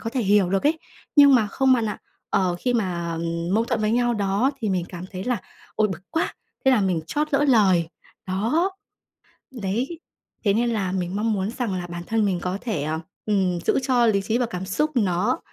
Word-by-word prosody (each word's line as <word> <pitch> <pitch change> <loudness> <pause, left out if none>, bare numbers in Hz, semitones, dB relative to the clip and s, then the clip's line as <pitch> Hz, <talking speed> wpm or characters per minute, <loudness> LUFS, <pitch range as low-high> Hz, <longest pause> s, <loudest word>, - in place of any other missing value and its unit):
có 225 - -4
thể 255 0 -1
hiểu 200 -3 +3
được 195 0 +1
ấy. 320 +1 +2 0.4
Nhưng 285 -2 +8
mà 220 -4 +4
không 265 +5 +2
bạn 235 -3 +2
ạ, - - -4 0.3
ờ, 180 -2 +1
khi 245 -1 0
mà, 175 -6 -1
ừm, 170 +2 -2
mâu 225 +2 +3
thuẫn 225 - -1
với 215 0 +1
nhau 240 0 +2
đó 205 +5 +1
thì 220 - -1
mình 185 -3 0
cảm 175 -1 -7
thấy 185 -1 -6
là 245 -4 -1 0.3
"Ôi, 215 -1 +2
bực 180 -3 -5
quá!", 325 - -1 0.3
thế 265 - +6
là 250 - +4
mình 185 -4 +1
trót 300 - -1
lỡ 285 +1 +3
lời, 190 -9 +4 0.4
đó. 230 - +1 0.9
Đấy, 245 - -2 0.5
thế 200 - +4
nên 235 +2 +1
là 200 -5 -1
mình 185 -1 -2
mong 220 +2 +1
muốn 195 +1 -1
rằng 235 -5 -2
là 180 -1 -4
bản 175 0 -6
thân 225 -1 +1
mình 185 -3 0
có 180 +1 -2
thể, 210 - -2
ờ, 155 +2 -2 0.3
ừm, 190 -4 +1
giữ - - +3
cho 250 -2 +3
lý 205 -3 +3
trí 220 +4 0
và 245 - +1
cảm 190 -5 -5
xúc 300 +11 0
nó 185 -4 +1
205 Hz, 225 wpm, -24 LUFS, 185-240 Hz, 0.9 s, Nhưng